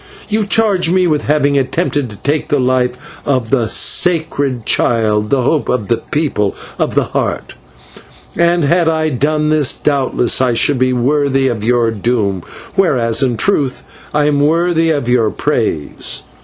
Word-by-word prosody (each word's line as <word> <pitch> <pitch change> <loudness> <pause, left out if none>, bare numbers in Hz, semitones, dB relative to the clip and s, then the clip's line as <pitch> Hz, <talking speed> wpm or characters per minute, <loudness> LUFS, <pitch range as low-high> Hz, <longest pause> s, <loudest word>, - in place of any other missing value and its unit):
You 215 -1 0
charge 200 -5 +2
me 185 +1 +2
with 155 -4 -1
having 145 -1 +2
attempted 145 -1 -1
to 105 - -10
take 145 +6 -2
the 145 - 0
life 125 -1 0 0.3
of 130 -5 -1
'the 120 -5 +1
sacred 145 - +1
child, 105 -2 +1
the 135 -2 +1
hope 150 +3 0
of 110 -5 -2
the 115 - +2
People 115 -6 -2 0.2
of - - -1
the - - +3
Heart,' - - -3 0.8
and, 170 0 +2
had 170 +3 +2
I 160 -1 0
done 150 +3 0
this, 150 -3 +2
doubtless 135 -4 0
I 125 -2 +1
should 130 +3 +1
be 130 0 +2
worthy 135 +1 +1
of 110 -4 -4
your 120 0 +2
doom, 105 -3 -1 0.3
whereas 130 - +1
in 125 -4 0
truth 140 - 0 0.3
I 150 0 +1
am 145 -1 +1
worthy 165 +2 +2
of 145 -6 -1
your 120 -3 +2
praise. 75 -7 -2
140 Hz, 160 wpm, -15 LUFS, 120-155 Hz, 0.8 s, the